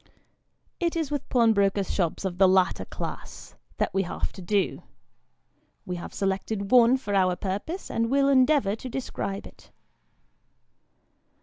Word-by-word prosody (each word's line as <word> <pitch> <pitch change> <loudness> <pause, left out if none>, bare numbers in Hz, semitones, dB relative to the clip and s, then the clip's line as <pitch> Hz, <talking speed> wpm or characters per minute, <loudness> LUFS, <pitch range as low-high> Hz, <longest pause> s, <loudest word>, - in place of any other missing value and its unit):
It 340 -2 0
is 320 -4 -2
with 290 -2 -3
pawnbrokers' 200 -5 +2
shops 175 0 -1
of 180 -1 -3
the 190 - +7
latter 185 0 +2
class, - - -8 0.2
that - - -1
we 195 - +2
have 180 - -4
to 190 - -10
do. 195 +2 0 1.0
We 180 -1 -4
have 175 - -8
selected 195 +1 -2
one 250 0 +6
for 205 -6 -5
our 185 -2 +3
purpose, 205 - -4
and 230 0 0
will 275 +1 +3
endeavour 260 -5 +3
to 255 +3 -8
describe 200 -6 -4
it. - - -15
205 Hz, 140 wpm, -26 LUFS, 190-260 Hz, 1.0 s, the